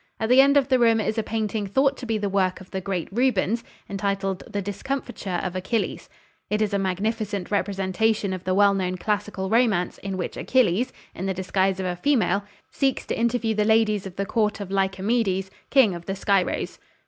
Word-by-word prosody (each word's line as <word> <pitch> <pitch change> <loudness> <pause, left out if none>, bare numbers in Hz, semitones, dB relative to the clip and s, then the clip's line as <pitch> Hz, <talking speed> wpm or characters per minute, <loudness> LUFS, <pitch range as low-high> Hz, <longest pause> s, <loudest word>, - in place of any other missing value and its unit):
At 220 - -1
the 255 +2 +8
end 280 +1 +5
of 275 - +3
the 260 -1 +4
room 230 -2 +4
is 220 +1 -1
a - - +2
painting 215 -1 -2
thought 270 +7 +2
to 250 - -7
be 225 -1 0
the 205 -1 -1
work 190 -2 +1
of 185 - -14
the 190 - -3
great 185 -3 -3
Rubens, 235 -1 +1 0.2
entitled 195 -1 -2
"The 205 - -2
Discomfiture 205 -1 -3
of 185 -1 -3
Achilles." 200 +4 -2 0.4
It 210 - 0
is 215 -2 0
a 200 - +2
magnificent 200 +1 -2
representation 200 +1 0
of 185 -1 -5
the 185 0 0
well 200 0 +5
known 185 -1 -1
classical 205 -1 -2
romance 220 -6 +2
in 195 -1 -4
which 180 - -4
Achilles, 245 -2 +2 0.2
in 190 - -4
the 190 - -1
disguise 190 +1 0
of 190 - -2
a 180 -1 -1
female, 205 -3 +1 0.3
seeks 270 -1 0
to - - -2
interview 235 -1 +1
the 210 0 +1
ladies 215 -2 +2
of 185 - -10
the 200 - -2
Court 215 0 0
of 195 -2 -6
Lycomedes, 195 0 0 0.2
King 260 -8 +5
of 170 0 -8
the 195 - -2
Scyros. 195 -1 0
200 Hz, 200 wpm, -24 LUFS, 190-225 Hz, 0.4 s, the